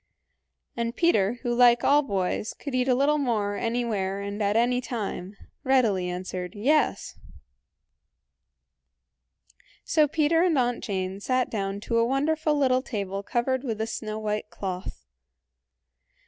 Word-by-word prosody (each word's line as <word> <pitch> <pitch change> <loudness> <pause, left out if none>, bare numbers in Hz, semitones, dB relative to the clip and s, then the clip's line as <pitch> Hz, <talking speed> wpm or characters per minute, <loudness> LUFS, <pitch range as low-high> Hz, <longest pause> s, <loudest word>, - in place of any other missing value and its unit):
And 235 0 -2
Peter, 225 - +3
who 240 - 0
like 240 0 +5
all 290 +2 +5
boys, 200 -5 -2
could 280 - -7
eat 255 0 +1
a 255 - +4
little 290 +3 +2
more 215 -7 0
anywhere 220 -5 -1
and 200 +1 -5
at 205 0 +1
any 245 +2 +2
time, 205 -5 -5 0.3
readily 225 -9 +2
answered, 180 +1 -5
"Yes." 290 +9 +1 2.6
So 310 -2 +3
Peter 315 +2 +2
and 345 -4 +2
Aunt 245 -1 0
Jane 190 -1 -3
sat 255 +4 0
down 195 -2 -3
to 230 +2 0
a - - +4
wonderful 300 +5 +1
little 260 -2 +3
table 200 -6 -4
covered 250 +5 -1
with 225 -5 -3
a 220 - 0
snow 215 -1 -5
white 210 -1 -3
cloth. 185 - -6
235 Hz, 135 wpm, -26 LUFS, 200-260 Hz, 2.6 s, like